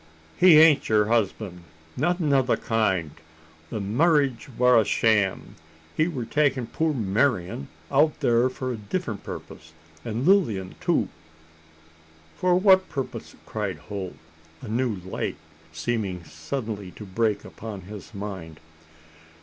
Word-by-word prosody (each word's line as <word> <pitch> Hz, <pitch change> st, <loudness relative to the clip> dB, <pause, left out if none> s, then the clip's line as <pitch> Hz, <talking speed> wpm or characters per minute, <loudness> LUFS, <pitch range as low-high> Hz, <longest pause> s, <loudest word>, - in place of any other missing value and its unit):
"He 180 Hz, -4 st, +7 dB
ain't 155 Hz, -2 st, +6 dB
her 105 Hz, -1 st, +3 dB
husband 105 Hz, -5 st, -1 dB, 0.3 s
nothin' 160 Hz, +1 st, +1 dB
o' 135 Hz, -, +5 dB
the 130 Hz, -, +1 dB
kind. 95 Hz, -9 st, 0 dB, 0.6 s
The 110 Hz, -, -4 dB
marriage 135 Hz, -, +1 dB
war 125 Hz, -2 st, +6 dB
a -, -, +1 dB
sham. 105 Hz, -2 st, +1 dB, 0.4 s
He 155 Hz, -, +2 dB
war 135 Hz, -9 st, -4 dB
takin' 140 Hz, -2 st, +1 dB
poor 160 Hz, +7 st, 0 dB
Marian 105 Hz, -, 0 dB, 0.2 s
out 150 Hz, +2 st, +4 dB
thar 120 Hz, +2 st, +2 dB
for 130 Hz, 0 st, -4 dB
a -, -, -5 dB
diffrent 110 Hz, -, -4 dB
purpose 80 Hz, +1 st, -9 dB, 0.3 s
an' 115 Hz, +2 st, -3 dB
Lilian 115 Hz, -, +2 dB
too." -, -, +1 dB, 1.3 s
"For 180 Hz, 0 st, +2 dB
what 190 Hz, -1 st, +5 dB
purpose?" 135 Hz, -3 st, -5 dB
cried -, -, -3 dB
Holt, 95 Hz, -3 st, -6 dB, 0.5 s
a -, -, -7 dB
new 115 Hz, +1 st, 0 dB
light 95 Hz, -, -3 dB, 0.3 s
seeming 90 Hz, +1 st, -2 dB
suddenly 105 Hz, -, -5 dB
to 105 Hz, -, -9 dB
break 105 Hz, +2 st, 0 dB
upon 105 Hz, -3 st, -8 dB
his 100 Hz, +4 st, -10 dB
mind. 95 Hz, -6 st, -7 dB
115 Hz, 130 wpm, -25 LUFS, 100-140 Hz, 1.3 s, He